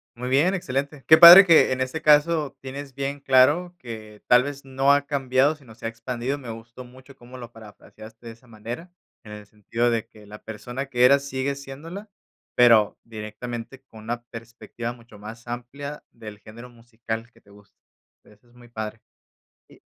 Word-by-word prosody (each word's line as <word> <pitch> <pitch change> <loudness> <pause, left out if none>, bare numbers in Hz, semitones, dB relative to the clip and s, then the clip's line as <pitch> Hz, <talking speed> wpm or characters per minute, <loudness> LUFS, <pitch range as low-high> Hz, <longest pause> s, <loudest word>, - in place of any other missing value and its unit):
Muy 125 +1 -6
bien, 145 +8 +2
excelente. 140 -4 -4
Qué 155 - +8
padre 175 +4 +11
que 165 -7 +5
en 130 0 -2
este 130 +5 -4
caso 150 -1 +3
tienes 135 +1 -8
bien 140 +2 -4
claro, 145 +7 +3
que 110 -5 -10
tal 125 0 +5
vez 140 0 -7
no 135 +1 +2
ha 140 0 0
cambiado, 135 +1 +1
sino 135 -7 -17
se 115 - -7
ha - - -2
expandido. 120 +3 -5
Me 125 -5 -9
gustó 115 +3 -11
mucho 130 +2 -17
cómo 125 +1 -14
lo 120 -1 -10
parafraseaste 110 +1 -15
de - - -7
esa 115 +3 -24
manera, 120 +9 -9 0.3
en 105 - -11
el 105 -1 -11
sentido 115 +3 -2
de 115 -1 -1
que 105 -2 -18
la 105 +1 -13
persona 125 +5 -7
que 125 -2 0
eras 140 +2 +4
sigue 135 +1 -3
siéndola, 160 +10 -10 0.4
pero 115 -4 +4
directamente 115 +3 -8
con 115 -5 -16
una 120 +2 -4
perspectiva 115 0 -8
mucho 115 -3 -17
más 110 +3 -11
amplia 135 +5 -7
del 110 -3 -11
género 115 +4 -13
musical 115 -1 -8
que - - -25
te - - -26
gusta. 100 0 -21 0.4
O - - -114
sea, - - -21
eso 105 +3 -28
es 120 - -26
muy 120 0 -17
padre. 110 -2 -7 0.7
Y - - -21
125 Hz, 190 wpm, -23 LUFS, 115-140 Hz, 0.7 s, padre